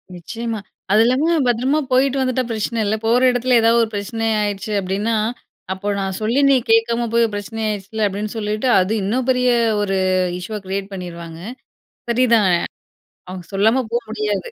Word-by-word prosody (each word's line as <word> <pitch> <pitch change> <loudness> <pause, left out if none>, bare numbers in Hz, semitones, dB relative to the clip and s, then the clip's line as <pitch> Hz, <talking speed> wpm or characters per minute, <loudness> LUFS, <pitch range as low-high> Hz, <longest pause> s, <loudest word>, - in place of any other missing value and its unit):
நிச்சயமா. 225 +5 -5 0.3
அது 210 +2 +5
இல்லாம 290 +8 +2
பத்திரமா 255 +5 +1
போயிட்டு 265 +1 +3
வந்துட்டா, 255 0 0
பிரச்சனை 225 +1 -2
இல்ல. 210 +2 +1
போற 235 +3 +3
இடத்தில 245 0 +2
ஏதாவது 230 +1 +4
ஒரு 225 - -2
பிரச்சனை 225 +3 -3 0.2
ஆயிடுச்சு 205 +1 -3
அப்படின்னா, 200 +5 -1 0.6
அப்போ 195 +2 -7
"நான் 190 -1 -3
சொல்லி 230 +5 +1
நீ 275 - +6 0.2
கேக்காம 235 +1 +2
போய், 230 -2 +3
பிரச்சனை 220 +2 -5
ஆயிருச்சுல்ல" 210 +1 -2
அப்படின்னு 205 +2 -4
சொல்லிட்டு, 215 +3 -2
அது 185 +2 0
இன்னும் 240 +6 -1
பெரிய 250 0 +2 0.3
ஒரு 195 -1 0 0.4
இஷ்யூவ 210 +4 -5
கிரியேட் 195 +1 -4
பண்ணிருவாங்க. 170 -3 -8 0.7
சரிதான். 230 -5 +3 0.8
அவங்க 185 -1 -7
சொல்லாம 220 +6 +3
போ 235 - +2
முடியாது. 210 -4 -2
220 Hz, 155 wpm, -20 LUFS, 200-240 Hz, 0.8 s, நீ